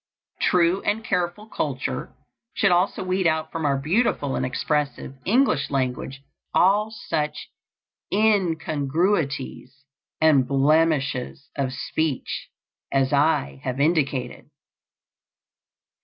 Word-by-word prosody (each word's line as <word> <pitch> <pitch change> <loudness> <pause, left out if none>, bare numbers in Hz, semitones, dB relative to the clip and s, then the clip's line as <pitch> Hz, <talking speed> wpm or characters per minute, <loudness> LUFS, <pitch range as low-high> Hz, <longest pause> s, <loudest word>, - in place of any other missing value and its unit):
True 180 +1 +3
and 220 +2 -1
careful 180 +2 -1
culture - - -3 0.4
should 195 - +3
also 180 +2 +2
weed 185 -1 +1
out 160 -1 0
from 160 -2 -1
our 140 -1 +2
beautiful 150 - 0
and - - -1
expressive 140 +1 -2
English 230 - +2
language 135 0 -2 0.3
all 205 +4 +4
such 155 -8 -4 0.6
incongruities 160 -7 0 0.3
and 150 -5 +4
blemishes 140 -1 +1
of 135 -2 -1
speech 140 +2 -3 0.4
as 135 0 +1
I 140 - +1
have 130 +1 -3
indicated. 140 -5 0
155 Hz, 95 wpm, -24 LUFS, 135-180 Hz, 0.6 s, all